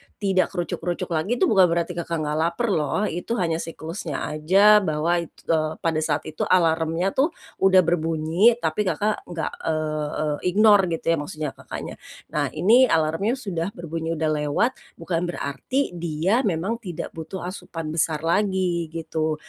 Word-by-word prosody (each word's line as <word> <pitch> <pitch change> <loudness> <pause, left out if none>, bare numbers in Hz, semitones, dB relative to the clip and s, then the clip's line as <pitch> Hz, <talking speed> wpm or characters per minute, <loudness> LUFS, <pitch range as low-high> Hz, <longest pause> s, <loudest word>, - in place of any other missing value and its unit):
tidak 195 -3 +1
krucuk-krucuk 175 0 -3
lagi 170 +9 0
itu - - 0
bukan 190 -5 +5
berarti 170 +1 0
Kakak 170 -2 -3
nggak 150 0 -1
laper 170 +9 0
loh, 160 +3 0
itu 210 +4 -2
hanya 165 -6 0
siklusnya 165 -1 -5
aja 195 +8 +5
bahwa 170 -1 0
it 170 - -5 0.2
eee, 155 -1 0
pada 160 -2 +1
saat 155 -2 -1
itu 155 - -4
alarmnya 165 +1 +2
tuh, 300 - +1 0.2
udah 190 -1 +5
berbunyi, 165 +6 +2
tapi 165 +6 0
Kakak 210 +3 -1
nggak, 170 -2 -3 0.2
eee, 155 -1 -1
eee, 150 -1 -1 0.2
ignore 205 -3 +6
gitu - - -11
ya - - +4
maksudnya 155 0 -4
Kakaknya. - - -8 0.3
Nah, 145 -1 0
ini 225 +11 +5
alarmnya 165 +7 +1
sudah 190 -10 -3
berbunyi 165 -1 -4
udah 160 0 0
lewat, 150 - +1 0.2
bukan 170 +1 -2
berarti, 175 - -2
dia 170 +5 0
memang 195 +6 -1
tidak 180 -8 -6
butuh 165 +3 -7
asupan 165 -3 -6
besar 155 -1 0
lagi, 180 -1 +1
gitu. 160 -1 -1
170 Hz, 155 wpm, -24 LUFS, 155-190 Hz, 0.3 s, ignore